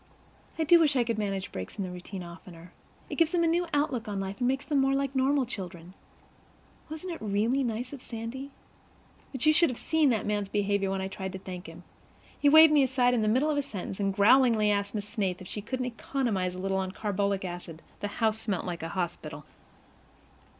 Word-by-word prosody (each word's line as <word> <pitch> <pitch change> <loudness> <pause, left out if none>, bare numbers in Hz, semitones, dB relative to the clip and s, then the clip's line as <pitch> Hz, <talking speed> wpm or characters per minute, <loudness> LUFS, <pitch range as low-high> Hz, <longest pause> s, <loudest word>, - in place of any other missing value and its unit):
I 325 - +1
do 340 +2 +7
wish 300 -3 +3
I 250 - +4
could 230 -2 -2
manage 195 -2 -2
breaks 95 0 -7
in 200 - -2
the 185 - -5
routine 180 +1 -7
oftener. 170 0 -12 0.3
It - - -6
gives 330 0 +3
them 345 -1 +3
a - - +3
new 345 +2 +1
outlook 280 -6 0
on 200 -2 -3
life 195 +2 -4
and 245 - +1
makes 270 +2 0
them 290 -3 +1
more 270 0 +2
like 275 0 -1
normal 265 +1 +2
children. 180 -6 -8 1.0
Wasn't 320 +3 -5
it - - -9
really 220 +6 +1
nice 245 +2 -3
of 275 - -8
Sandy? 235 +4 -6 0.8
But 265 0 -3
you 310 - +6
should 335 +1 +4
have 250 - -5
seen 320 -3 +2
that 225 -4 0
man's 205 -1 -1
behavior 200 -1 0
when 195 0 -1
I 190 - -2
tried 190 -1 -6
to - - -4
thank 185 -2 -8
him. 165 +2 -12 0.6
He 290 - +5
waved 315 +1 +8
me 295 - +6
aside 255 -2 +3
in 240 - +2
the 215 - +1
middle 260 +8 +3
of 295 - -1
a - - +3
sentence, 200 -7 -6
and 195 -1 +1
growlingly 215 +1 +5
asked 200 +1 -1
Miss 205 -1 -3
Snaith 200 -4 -2
if 185 - -10
she 210 - -5
couldn't 255 +4 -3
economize 230 -7 -2
a - - -7
little 190 +1 -1
on 190 -1 -2
carbolic 200 -1 -1
acid. 175 -2 -7 0.2
The 205 - -2
house 220 +1 0
smelt 205 -5 -2
like 175 -2 -4
a 165 - -4
hospital. 175 -2 -4
215 Hz, 220 wpm, -28 LUFS, 190-270 Hz, 1.0 s, waved